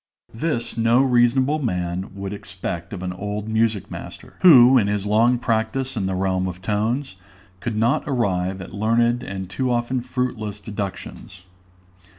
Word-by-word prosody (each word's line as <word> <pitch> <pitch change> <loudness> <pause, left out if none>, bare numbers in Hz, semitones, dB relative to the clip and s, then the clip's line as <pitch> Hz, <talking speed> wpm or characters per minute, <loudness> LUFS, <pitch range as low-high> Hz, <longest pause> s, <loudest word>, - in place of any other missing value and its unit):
This 120 -3 -2
no 115 +3 +4
reasonable 130 +3 +3
man 90 - -3
would 100 0 -5
expect 90 -3 -6
of 95 -2 -6
an 90 -1 -3
old 105 +3 -4
music 110 -3 0
master, - - -9
who, 130 -7 +8
in 100 - +1
his 100 -1 -1
long 115 +4 +3
practice 120 +3 -1
in 100 -4 -1
the 95 - -2
realm 95 0 0
of 90 0 -6
tones, 105 +3 -2 0.4
could 115 +3 -3
not 115 +4 +1
arrive 95 -8 -1
at - - -9
learned 115 +3 +2
and 95 -1 -6
too 125 +8 -2
often 120 +1 0
fruitless 120 -5 -3
deductions. 100 -3 -7
110 Hz, 155 wpm, -22 LUFS, 95-120 Hz, 0.4 s, who